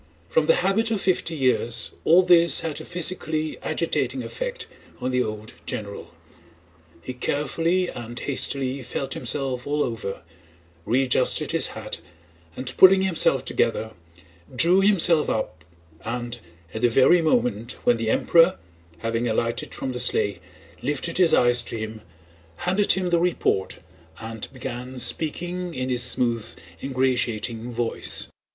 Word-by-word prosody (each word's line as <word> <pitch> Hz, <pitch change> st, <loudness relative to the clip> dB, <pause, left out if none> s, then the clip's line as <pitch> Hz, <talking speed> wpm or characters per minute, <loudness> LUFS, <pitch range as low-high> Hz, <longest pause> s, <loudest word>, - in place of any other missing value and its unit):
From 485 Hz, -, +2 dB
the -, -, +5 dB
habit 225 Hz, +4 st, +2 dB
of 220 Hz, -3 st, 0 dB
fifty 180 Hz, -3 st, 0 dB
years 125 Hz, -4 st, +1 dB
all 175 Hz, +3 st, +6 dB
this 170 Hz, -4 st, +5 dB
had 160 Hz, -3 st, -4 dB
a -, -, -10 dB
physically 160 Hz, -3 st, -2 dB
agitating -, -, -1 dB
effect -, -, -5 dB, 0.3 s
on 130 Hz, -, -2 dB
the 125 Hz, 0 st, +1 dB
old 110 Hz, 0 st, -5 dB
general. 100 Hz, -1 st, -6 dB, 0.9 s
He 130 Hz, -, -5 dB
carefully 165 Hz, +7 st, 0 dB
and 120 Hz, -3 st, -7 dB
hastily 135 Hz, -1 st, -1 dB
felt 130 Hz, +2 st, -4 dB
himself 130 Hz, 0 st, -1 dB
all 150 Hz, +1 st, +1 dB
over, 110 Hz, -7 st, -5 dB, 0.6 s
readjusted 125 Hz, +2 st, +2 dB
his -, -, +3 dB
hat, -, -, -6 dB, 0.6 s
and 125 Hz, 0 st, -3 dB
pulling 190 Hz, 0 st, +7 dB
himself 160 Hz, -8 st, +2 dB
together 110 Hz, -2 st, 0 dB, 0.6 s
drew 175 Hz, +9 st, +4 dB
himself 175 Hz, -6 st, +4 dB
up 80 Hz, -8 st, -3 dB, 0.4 s
and, 120 Hz, +1 st, -4 dB, 0.3 s
at 110 Hz, -, -5 dB
the 120 Hz, -, +4 dB
very 135 Hz, +9 st, +5 dB
moment 200 Hz, -, 0 dB
when 120 Hz, -, +3 dB
the 115 Hz, -1 st, -2 dB
Emperor, 165 Hz, -, +4 dB, 0.4 s
having 115 Hz, +6 st, -2 dB
alighted 115 Hz, +2 st, -1 dB
from 130 Hz, -, -4 dB
the 125 Hz, -, -4 dB
sleigh, 105 Hz, -4 st, +2 dB, 0.4 s
lifted 145 Hz, +6 st, -2 dB
his 175 Hz, -3 st, +5 dB
eyes 120 Hz, -4 st, +4 dB
to 115 Hz, -, -6 dB
him, 110 Hz, 0 st, -6 dB, 0.5 s
handed 185 Hz, -, +2 dB
him 185 Hz, -2 st, -1 dB
the 170 Hz, -, +3 dB
report 165 Hz, -, 0 dB, 0.4 s
and 110 Hz, -1 st, -7 dB
began 125 Hz, -1 st, -7 dB
speaking 175 Hz, +5 st, -1 dB
in 130 Hz, 0 st, -3 dB
his 125 Hz, -1 st, 0 dB
smooth, 120 Hz, -2 st, 0 dB, 0.3 s
ingratiating 125 Hz, -3 st, -1 dB
voice. 120 Hz, 0 st, -2 dB
130 Hz, 135 wpm, -24 LUFS, 120-170 Hz, 0.9 s, pulling